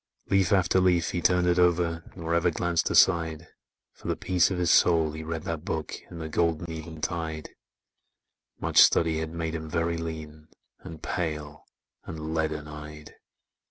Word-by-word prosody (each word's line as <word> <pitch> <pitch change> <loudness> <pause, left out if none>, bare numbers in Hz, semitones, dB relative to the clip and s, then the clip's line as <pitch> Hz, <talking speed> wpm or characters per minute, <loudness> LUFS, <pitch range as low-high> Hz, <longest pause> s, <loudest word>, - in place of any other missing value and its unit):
Leaf 95 -3 +3
after 95 -1 +3
leaf 90 -2 +2
he 85 - -2
turned 90 0 +3
it 90 0 +2
o'er 85 -2 +2
Nor 85 -2 -3
ever 85 +1 +3
glanced 85 0 0
aside, 85 -3 +3 0.5
For - - -12
the - - 0
peace 90 -1 +2
of 95 - -2
his 90 0 +2
soul 80 -3 +4
he 80 +1 -7
read 80 0 -4
that 80 -2 -4
book 80 -3 -3
In - - -9
the 80 -1 -5
golden 85 +1 -1
eventide: 80 -1 -5 1.1
Much - - +4
study 80 -1 +4
had 80 0 -3
made 80 -1 -3
him 80 -1 -5
very 85 0 -1
lean, 80 -2 -7 0.3
And 80 -2 -11
pale, 75 -3 -4 0.4
and 80 -1 -6
leaden 80 -2 -2
eyed. 75 0 -10
80 Hz, 160 wpm, -27 LUFS, 80-85 Hz, 1.1 s, soul